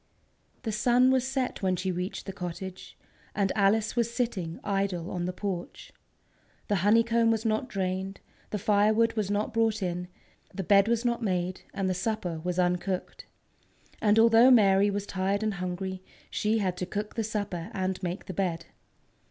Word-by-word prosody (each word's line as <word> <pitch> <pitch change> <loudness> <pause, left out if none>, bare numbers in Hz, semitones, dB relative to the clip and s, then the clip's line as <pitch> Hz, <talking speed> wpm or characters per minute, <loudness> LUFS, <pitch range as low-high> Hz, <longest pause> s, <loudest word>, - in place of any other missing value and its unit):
The 225 - -2
sun 245 +4 +4
was 260 -1 +2
set 265 -1 -2
when 185 -2 +1
she 185 +1 -2
reached 180 +2 -4
the 195 - -5
cottage, 185 0 -7 0.4
and 195 -2 +1
Alice 215 +3 +2
was 235 -1 +1
sitting 205 -9 -2
idle 195 -3 -1
on 175 -1 -2
the 180 - -1
porch. 180 -2 -5 0.8
The 205 - +2
honeycomb 230 +4 +3
was 225 0 0
not 220 +3 0
drained, 190 -1 -3 0.3
the 210 - -2
firewood 215 +3 +3
was 215 -3 -1
not 205 +1 -1
brought 225 -2 +1
in, 180 0 -3 0.4
the 195 - -4
bed 200 +2 +5
was 235 +1 +1
not 240 0 0
made, 185 -3 -1
and 195 -1 -2
the 185 - +1
supper 185 -4 -2
was 180 0 -2
uncooked. 180 +1 -1 0.7
And 210 0 +4
although 230 +2 +7
Mary 200 -4 +5
was 200 0 -2
tired 195 +2 -1
and 215 -1 0
hungry, 185 +1 -4 0.3
she 215 +1 +1
had 185 -4 -1
to 180 - -3
cook 210 +2 -4
the 225 - -1
supper 205 -4 -3
and 190 -2 -2
make 180 +1 -4
the 190 - -6
bed. 170 -2 -2
200 Hz, 170 wpm, -28 LUFS, 185-220 Hz, 0.8 s, although